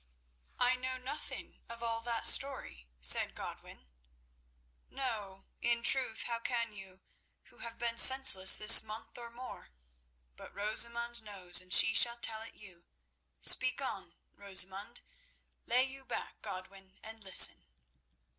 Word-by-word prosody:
"I 250 +1 +1
know 255 0 -5
nothing 265 +4 -9
of 235 0 -10
all 230 -1 -4
that 230 -1 -4
story," 65 - 0
said 65 - +2
Godwin. - - -10 1.0
"No, 210 -8 -7 0.2
in 235 0 -1
truth, 255 -4 +2
how 235 -1 -4
can 230 -2 -3
you, 190 -1 -13 0.5
who - - -19
have 230 0 -9
been 235 0 -1
senseless 260 -8 +7
this 210 +1 +7
month 220 +2 -10
or 235 -1 -10
more? 245 +2 -11 0.7
But - - -14
Rosamund 235 +3 -4
knows, 190 -5 -2
and 185 0 -16
she 220 - +6
shall 235 +2 +3
tell 220 -2 +1
it 225 - -11
you. 185 -4 -15 0.5
Speak - - +2
on, - - -7 0.2
Rosamund. 195 +3 -5 0.7
Lay 250 +2 +2
you 270 0 -8
back, - - -7
Godwin, 190 -1 -10
and 220 0 -10
listen." 190 -1 +4
230 Hz, 135 wpm, -32 LUFS, 195-240 Hz, 1.0 s, senseless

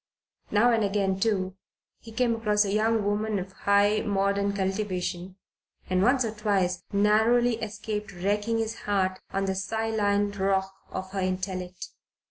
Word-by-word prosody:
Now 225 +4 +4
and 225 -1 +2
again 195 -1 0
too, 190 -3 0 0.4
he 225 - -12
came 235 +1 +1
across 210 -2 +2
a 195 - -2
young 220 0 +2
woman 210 +1 0
of 190 0 -5
high 200 +2 +2
modern 200 -1 +1
cultivation, 190 -2 -2 0.6
and 185 0 +3
once 250 +3 +3
or 220 - -2
twice 195 -4 0
narrowly 220 +4 +3
escaped 210 -1 -4
wrecking 205 +5 -1
his 225 0 -1 0.2
heart 190 -2 +1
on 195 0 -1
the 190 - 0
Scylline 205 0 0
rock 190 0 +1 0.2
of 190 0 -6
her 195 - -3
intellect. 185 -1 -3
205 Hz, 145 wpm, -27 LUFS, 190-220 Hz, 0.6 s, Now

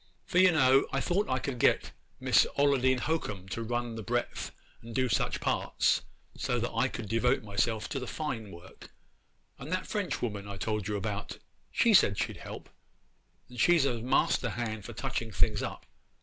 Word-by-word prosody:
For, 180 - +2
you 185 -1 +7
know, 135 -4 +4
I 135 - 0
thought 190 +8 0
I 130 - +2
could 130 -1 -4
get - - +3 0.3
Miss - - +4
Ollodine 130 -3 +3
Hocum 105 - -2
to 115 - -4
run 120 +1 -2
the 110 - -5
breadth 120 +4 -2 0.3
and 115 0 -10
do 130 -1 +2
such 115 - 0
parts, - - +1 0.3
so - - -1
that - - -2
I - - +2
could 115 - -6
devote 115 +4 +1
myself 110 +2 -1
to 135 - -2
the 125 - -6
fine 120 -9 -4
work; 85 -1 -13 0.7
and 145 +5 -8
that 185 0 -1
French 205 -3 -2
woman 105 -4 -3
I 100 - -6
told 105 -1 -2
you 105 - -1
about, 100 +1 -4 0.3
she 230 - +3
said 100 - +5
she'd - - -2
help, - - -9 0.8
and 125 -1 -11
she's 170 -5 +5
a 120 -4 -1
master 125 0 +2
hand 110 -2 -4
for - - -7
touching 115 -1 -3
things 85 -4 +1
up. - - -5
120 Hz, 185 wpm, -30 LUFS, 105-135 Hz, 0.8 s, you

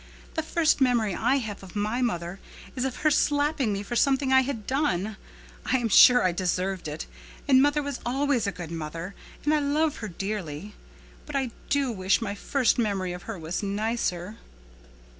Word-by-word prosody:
The 320 - -1
first 315 -2 +1
memory 235 -6 +3
I 245 +8 +2
have 220 -7 -3
of 190 0 -12
my 215 +4 -1
mother 175 -5 -2 0.4
is 255 0 -1
of 260 -2 -2
her 305 - +6
slapping 290 -4 +2
me 200 0 -2
for 240 +4 -5
something 270 +1 +2
I 265 - +7
had 250 -5 -4
done. 220 - 0 0.5
I 260 - +1
am 235 -2 -1
sure 245 +4 +8
I 185 - +3
deserved 185 0 -1
it, 150 +1 -5 0.4
and 260 -2 +6
mother 290 +1 +2
was 280 -2 -4
always 265 -2 0
a - - 0
good 175 -4 -8
mother 165 +3 -5 0.3
and 300 - +3
I 305 - +3
love 295 +2 +1
her 215 - -5
dearly. 195 -1 -5 0.5
But 295 - -6
I 265 -3 0 0.2
do 280 -3 +1
wish 190 -3 +1
my 215 -4 -3
first 250 +4 +1
memory 195 -5 0
of 180 +5 -9
her 225 - -4
was 165 +1 -4
nicer." 205 -1 -2
225 Hz, 185 wpm, -26 LUFS, 190-270 Hz, 0.5 s, sure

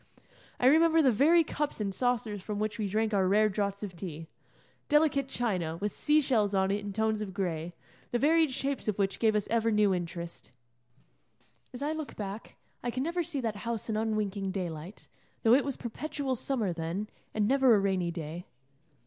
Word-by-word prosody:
I - - +1
remember 320 +3 +6
the 265 - +5
very 315 +9 +5
cups 295 -3 -3
and 200 -2 -2
saucers 235 -3 -1
from 210 +2 -4
which 215 +1 -2
we 210 - 0
drank 220 +2 0
our 190 -2 +3
rare 215 +3 +4
draughts 200 0 -2
of 190 -4 -6
tea 165 -3 -6 0.6
delicate 295 -3 +3
china, 185 -11 -2
with 205 +4 -2
sea 305 0 +3
shells 215 -8 +1
on 190 0 +2
it 200 - 0
in 205 0 -6
tones 220 +1 0
of 195 -3 -5
gray, 175 -3 -3 0.3
the 240 - 0
varied 315 +3 +3
shapes 275 0 -2
of 210 - 0
which 195 -1 0
gave 220 -2 +3
us 210 - 0
ever 230 0 +2
new 210 -2 +3
interest. 170 -5 -5 1.2
As 255 +2 -6
I 295 - 0
look 315 -2 -5
back, 205 +1 -6 0.3
I 240 - -2
can 255 +2 -2
never 340 +3 -1
see 320 -5 -3
that 220 -3 -2
house 230 +1 -3
in - - -1
unwinking 215 -3 -1
daylight, 180 -1 -5 0.4
though 230 - +6
it 275 - +5
was 275 -2 -3
perpetual 270 +2 -3
summer 225 -7 -1
then, 170 +5 -3 0.3
and 210 -1 +2
never 265 -2 +5
a - - +4
rainy 190 -3 0
day. 170 +1 -6
215 Hz, 190 wpm, -30 LUFS, 195-260 Hz, 1.2 s, remember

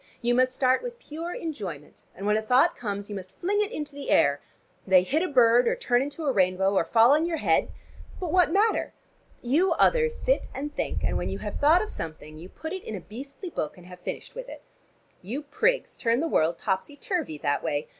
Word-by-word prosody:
You 240 0 +1
must 255 +1 +2
start 255 -1 +3
with 485 -1 -6
pure 330 -4 -7
enjoyment, 190 - -6
and 195 - -7
when 210 +1 +3
a 220 - +1
thought 255 +10 +3
comes, 205 -3 -4
you 205 - -6
must 185 -1 -8
fling 410 +4 +1
it 420 +1 -1
into 300 -9 -5
the 285 0 -7
air. 140 0 +3 0.5
They 185 -1 +6
hit 290 - 0
a 370 - 0
bird, 245 -4 +5
or - - +2
turn 245 0 +1
into 290 +3 -4
a 280 - +3
rainbow, 190 -2 +2
or 190 - +3
fall 230 +5 +5
on 310 +3 +3
your 335 -2 -1
head - - +2 0.5
but 355 -4 -3
what 360 -3 +4
matter? 425 +5 +2 0.5
You 305 +10 +3
others 470 -1 +3
sit - - 0
and 295 +2 -4
think, - - -2
and - - 0
when - - -3
you - - -3
have - - -5
thought 315 +6 +5
of 430 - -7
something 155 -1 -8
you 175 +3 -10
put 320 - -7
it 380 - -5
in 220 - -5
a - - -5
beastly 275 - -9
book, 155 - -4
and 180 - -14
have 180 0 -12
finished - - -6
with - - -8
it. - - -10 0.6
You 240 +11 -5
prigs - - 0
turn 230 0 +1
the 330 - 0
world 165 - +1
topsy 190 +10 -2
turvy 355 - -3
that 145 0 -1
way. 145 0 -2
255 Hz, 225 wpm, -26 LUFS, -, 0.6 s, They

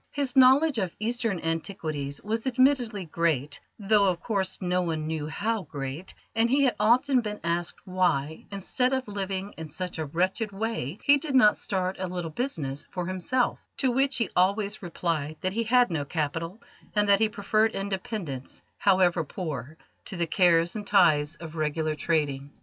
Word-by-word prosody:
His 280 -3 -2
knowledge 265 +1 +6
of 185 -4 -2
Eastern 230 -3 -1
antiquities 160 -4 -3
was 225 +4 -2
admittedly 250 -6 +2
great, 155 -4 -1 0.2
though, 205 -1 +3
of 180 -2 +1
course, 190 -2 -1
no 180 -1 0
one 160 -3 -2
knew 155 -1 -3
how 215 +7 -1
great, 140 +1 -6 0.2
and 225 +1 +3
he 280 +3 +3
had 260 - +2
often 250 +5 +4
been 210 -2 -5
asked 170 0 -2
why, 160 -5 0
instead 250 +6 -1
of 260 -2 -1
living 195 -1 -4
in 160 -1 -6
such 180 +2 -4
a 160 - -1
wretched 185 +8 -1
way, 200 - -3
he 285 0 +6
did 285 -1 -3
not 210 -5 +6
start 185 -1 -2
a 185 - -2
little 175 -2 -4
business 150 - -3
for 180 -1 -4
himself; 185 +8 0 0.2
to 260 - +2
which 270 +2 +2
he 230 - -1
always 200 +3 +1
replied 165 -4 -2
that 185 0 -1
he 230 +2 -1
had 245 -2 +4
no 155 -3 -1
capital, 165 +6 -3 0.4
and 210 0 +3
that 200 0 +5
he 220 -1 +3
preferred 215 +1 +1
independence, 195 - -5 0.2
however 185 -3 +3
poor, 155 -3 -6 0.3
to 190 - -5
the 170 - +1
cares 170 0 +3
and 205 -2 -5
ties 155 -6 +4
of 165 -1 -9
regular 155 0 -1
trading. 145 -3 -1
185 Hz, 170 wpm, -27 LUFS, 160-220 Hz, 0.4 s, knowledge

